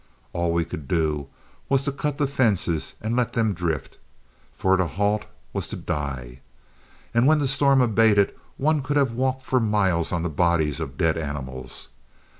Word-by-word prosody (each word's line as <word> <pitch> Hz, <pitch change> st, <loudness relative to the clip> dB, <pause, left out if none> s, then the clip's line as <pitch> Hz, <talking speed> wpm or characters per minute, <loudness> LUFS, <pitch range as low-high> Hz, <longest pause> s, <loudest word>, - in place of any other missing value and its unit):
All 85 Hz, -1 st, 0 dB
we 85 Hz, 0 st, +1 dB
could 75 Hz, -2 st, -7 dB
do 75 Hz, -4 st, 0 dB, 0.4 s
was 135 Hz, 0 st, +3 dB
to 140 Hz, -, -1 dB
cut 145 Hz, +1 st, -3 dB
the 145 Hz, -, +2 dB
fences 105 Hz, -, +1 dB
and 110 Hz, +2 st, -1 dB
let 125 Hz, -1 st, 0 dB
them 110 Hz, -3 st, +1 dB
drift, 85 Hz, -6 st, -3 dB, 0.6 s
for 95 Hz, 0 st, +3 dB
to 95 Hz, -2 st, +1 dB
halt 105 Hz, +3 st, 0 dB, 0.3 s
was -, -, -1 dB
to -, -, -5 dB
die; 65 Hz, -4 st, -4 dB, 0.7 s
and 120 Hz, +2 st, +4 dB
when 155 Hz, +1 st, +5 dB
the 145 Hz, -2 st, +1 dB
storm 135 Hz, 0 st, +4 dB
abated 110 Hz, -4 st, +4 dB, 0.2 s
one 155 Hz, +1 st, +2 dB
could 145 Hz, +2 st, -1 dB
have 135 Hz, -4 st, +3 dB
walked 130 Hz, +2 st, -1 dB
for 130 Hz, -1 st, +1 dB
miles 100 Hz, -7 st, +1 dB
on 85 Hz, -2 st, -1 dB
the -, -, 0 dB
bodies 80 Hz, -2 st, +1 dB
of 65 Hz, +1 st, -5 dB
dead 80 Hz, 0 st, +2 dB
animals. 65 Hz, -4 st, -5 dB
100 Hz, 175 wpm, -24 LUFS, 80-130 Hz, 0.7 s, when